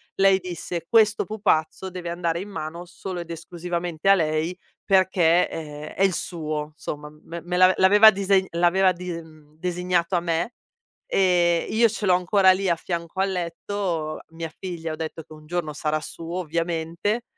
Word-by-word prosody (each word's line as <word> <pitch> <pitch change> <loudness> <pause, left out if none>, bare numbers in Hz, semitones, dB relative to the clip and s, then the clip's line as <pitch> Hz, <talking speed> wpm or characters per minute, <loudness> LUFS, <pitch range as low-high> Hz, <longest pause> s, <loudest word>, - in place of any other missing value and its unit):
lei 195 0 +4
disse: 175 -1 -5
"Questo 220 -2 +4
pupazzo 190 -4 0
deve 180 -1 -6
andare 170 0 -1
in 205 - -8
mano 170 -2 -6
solo 180 0 -6
ed 170 0 -9
esclusivamente 175 +1 -3
a - - +9
lei 160 0 0 0.3
perché, 185 -3 +4
ehm, 150 -2 -7
è 195 - +1
il 190 -2 +4
suo", 155 -3 -4
somma 150 -1 -6
me 170 0 -7
me 175 +2 -4
l'ave 185 +1 +6
l'aveva 205 +3 +8
dise 195 -1 +2
l'aveva 175 +2 +3
dise 175 -1 -5
mhmm, 155 -1 -19
designato 180 +1 0
a - - +3
me 170 +4 -1 0.6
e 175 -3 +3
io 230 +1 +4
ce 210 -1 -4
l'ho 185 - +5
ancora 185 +1 +4
lì 190 0 +1
a 170 - +3
fianco 170 +2 -4
al 195 0 +1
letto. 170 -2 -3
Mia 165 -1 -6
figlia 170 -4 -5
ho - - -3
detto 160 0 -5
che 155 - -14
un 155 0 -14
giorno 165 -2 -2
sarà 155 +1 -1
suo 165 +3 -6
ovviamente, 170 +6 -2
175 Hz, 175 wpm, -24 LUFS, 165-190 Hz, 0.6 s, a